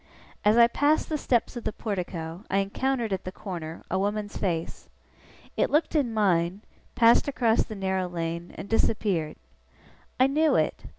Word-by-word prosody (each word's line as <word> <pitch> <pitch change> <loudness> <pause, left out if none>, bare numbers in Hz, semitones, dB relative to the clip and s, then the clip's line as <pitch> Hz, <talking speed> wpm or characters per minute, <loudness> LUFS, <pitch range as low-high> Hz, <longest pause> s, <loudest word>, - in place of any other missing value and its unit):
As 210 +2 +4
I 235 - +9
passed 290 +6 +1
the 310 - -1
steps 240 -2 0
of 240 - -6
the - - -1
portico, 180 -4 -5
I 195 - +1
encountered, 230 +3 -1
at 190 - -3
the 185 - -5
corner, 170 -5 -7
a 190 - +1
woman's 205 +1 -2
face. 170 -4 -3 0.7
It - - +1
looked 300 +3 +1
in 280 -7 +1
mine, 190 -3 +1 0.3
passed 230 +3 +5
across 235 -5 +2
the 220 - -8
narrow 190 -2 -1
lane, 170 0 -4
and - - -7
disappeared. 200 -7 0 0.8
I 260 - +6
knew 305 +3 +2
it. - - 0
205 Hz, 165 wpm, -26 LUFS, 180-235 Hz, 0.8 s, I